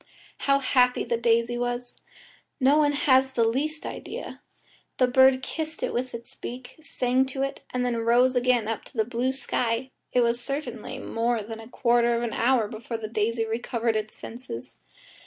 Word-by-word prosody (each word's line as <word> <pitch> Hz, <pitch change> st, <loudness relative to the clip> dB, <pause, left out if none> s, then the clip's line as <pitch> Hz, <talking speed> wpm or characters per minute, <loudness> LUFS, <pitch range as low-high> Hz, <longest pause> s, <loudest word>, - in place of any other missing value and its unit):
How 275 Hz, 0 st, +5 dB
happy 250 Hz, -2 st, +3 dB
the 235 Hz, -, 0 dB
daisy 235 Hz, +1 st, +2 dB
was! 245 Hz, 0 st, -3 dB, 0.6 s
No 280 Hz, +3 st, +5 dB
one 290 Hz, -1 st, +3 dB
has 265 Hz, -2 st, +3 dB
the 230 Hz, -3 st, +3 dB
least 300 Hz, +6 st, -1 dB
idea. -, -, -7 dB, 0.6 s
The 255 Hz, -, +5 dB
bird 260 Hz, +1 st, +5 dB
kissed 315 Hz, +1 st, -4 dB
it -, -, -1 dB
with 250 Hz, 0 st, -2 dB
its 235 Hz, 0 st, -7 dB
beak, 245 Hz, +1 st, -8 dB
sang 255 Hz, -3 st, +1 dB
to 265 Hz, +1 st, -3 dB
it, 275 Hz, -, -3 dB
and 250 Hz, 0 st, -1 dB
then 240 Hz, -1 st, 0 dB
rose 240 Hz, +3 st, +3 dB
again 245 Hz, -3 st, +2 dB
up 225 Hz, -1 st, -3 dB
to 255 Hz, -, -15 dB
the 220 Hz, -, +3 dB
blue 245 Hz, +2 st, 0 dB
sky. 255 Hz, -1 st, -2 dB, 0.2 s
It 250 Hz, -, +3 dB
was 235 Hz, 0 st, +1 dB
certainly 280 Hz, +4 st, -5 dB
more 230 Hz, -1 st, -1 dB
than 225 Hz, +1 st, -7 dB
a 225 Hz, -, -10 dB
quarter 240 Hz, -1 st, +2 dB
of 235 Hz, -, -1 dB
an 235 Hz, -, -2 dB
hour 240 Hz, -2 st, +2 dB
before 225 Hz, +2 st, -5 dB
the 220 Hz, -1 st, -5 dB
daisy 225 Hz, +1 st, 0 dB
recovered 230 Hz, 0 st, -1 dB
its 215 Hz, 0 st, -3 dB
senses. 125 Hz, -, -8 dB
245 Hz, 180 wpm, -26 LUFS, 230-260 Hz, 0.6 s, How